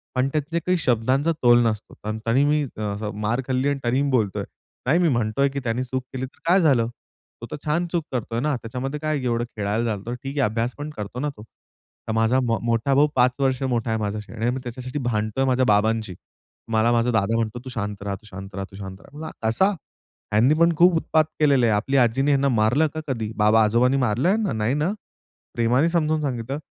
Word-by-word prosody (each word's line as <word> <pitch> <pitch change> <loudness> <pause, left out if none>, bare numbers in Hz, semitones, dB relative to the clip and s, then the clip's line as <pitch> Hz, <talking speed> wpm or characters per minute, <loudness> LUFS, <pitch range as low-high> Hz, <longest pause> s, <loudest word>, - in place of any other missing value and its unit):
पण 130 +1 +2
त्यातले 155 +3 -1
काही 180 +2 0
शब्दांचा 130 +2 +1
तोल 120 0 +7
नसतो. 110 -2 -2
तं 110 +1 -2
तरी 120 +4 +3
मी 150 +1 +2 0.2
असं 105 0 -3
मार 110 +5 0
खाल्ली 130 +1 +1
आणि 140 -1 -1
तरी 125 +3 +1
मी 140 - 0
बोलतोय, 110 -7 0 0.4
"नाही 155 +7 +3
मी 175 -2 +3
म्हणतोय 120 +2 +1
की 140 +1 -4
त्यानी 120 +1 -1
चूक 130 0 -3
केली 130 0 -3
तर 130 - -17
काय 185 +2 +5
झालं? 130 -8 +3 0.5
तो - - -5
तर - - -3
छान 170 +4 0
चूक 170 -2 0
करतोय 115 -2 -2
ना! 150 +2 0
त्याच्यामध्ये 130 +5 -5
काय 155 -1 -1
की 130 - -5
एवढं 120 -1 0
खेळायला 105 +3 -1
चालतो. 110 +1 -3
ठीक 135 +3 -7
आहे - - +3
अभ्यास 115 +3 -2
पण 145 +1 -5
करतो 105 +4 -5
ना 150 +2 -1
तो." 105 - -10
तर 110 - -13
माझा 115 +3 +3
मा 115 -2 +1
मोठा 115 +3 +1
भाऊ 145 +2 +5
5 125 0 +4
वर्ष 130 -2 +1
मोठा 120 -3 -1
आहे 110 - 0
माझ्याशी 105 0 -4
आणि 115 +1 -1
मी 130 +2 -2
त्याच्यासाठी 125 +3 -5
भांडतोय 110 +3 0
माझ्या 130 0 +2
बाबांशी. 110 -2 +1 0.6
मला 110 +1 +3
माझा 120 +1 +2
दादा 110 0 +1
म्हणतो, 115 +1 -2
"तू - - -6
शांत 105 -4 -4
रहा, 100 -1 -2
तू 105 +3 -15
शांत 95 +1 -9
रहा 100 - -3
तू - - -13
शांत 95 -1 -8
रहा." 145 - -15
म्हणलं, 160 +1 -6 0.2
"असा? 190 - +3 0.6
ह्यांनी 115 +7 +4
पण 170 0 +5
खूप 175 +1 +6
उत्पात 160 -1 +2 0.2
केलेलं 140 -5 +4
आहे. 110 - +3
आपली 135 +7 0
आजीनी 135 +3 +3
ह्यांना 140 0 +3
मारलं 120 +6 +3
का 155 - -4
कधी? 115 -5 -3
बाबा 110 +1 +5
आजोबांनी 120 +5 +3
मारलं 125 +3 +1
ह्यांना? 210 -1 +1
नाही 110 +3 0
ना? 150 +5 0 0.6
प्रेमाने 125 +7 +2
समजून 155 -2 +1
सांगितलं. 130 -1 -3
125 Hz, 220 wpm, -23 LUFS, 110-140 Hz, 0.6 s, तोल